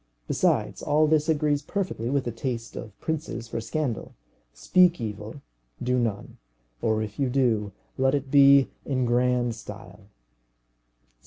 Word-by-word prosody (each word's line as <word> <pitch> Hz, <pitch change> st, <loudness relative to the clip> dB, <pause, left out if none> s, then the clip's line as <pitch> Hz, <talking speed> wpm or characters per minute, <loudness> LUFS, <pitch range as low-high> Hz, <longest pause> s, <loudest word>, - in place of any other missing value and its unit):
Besides, -, -, +1 dB
all 155 Hz, +1 st, +3 dB
this 155 Hz, 0 st, +2 dB
agrees 150 Hz, -2 st, +2 dB
perfectly 160 Hz, -, -3 dB
with 140 Hz, 0 st, +1 dB
the 120 Hz, -, -3 dB
taste 115 Hz, 0 st, -4 dB
of 105 Hz, -3 st, -9 dB
princes 150 Hz, -7 st, -4 dB
for 115 Hz, 0 st, -4 dB
scandal. 125 Hz, +1 st, -3 dB, 0.4 s
Speak 175 Hz, -, +3 dB
evil, 110 Hz, +3 st, -6 dB, 0.4 s
do 125 Hz, +1 st, 0 dB
none; 110 Hz, -4 st, -3 dB, 0.4 s
or 110 Hz, -1 st, +1 dB
if 105 Hz, +3 st, -8 dB
you 135 Hz, -2 st, +1 dB
do, 120 Hz, -6 st, +1 dB, 0.3 s
let 135 Hz, +1 st, +3 dB
it 140 Hz, -1 st, -3 dB
be 140 Hz, -1 st, +6 dB
in 130 Hz, -3 st, -1 dB
grand 120 Hz, 0 st, +1 dB
style. 105 Hz, -2 st, -11 dB
125 Hz, 140 wpm, -26 LUFS, 115-145 Hz, 0.4 s, be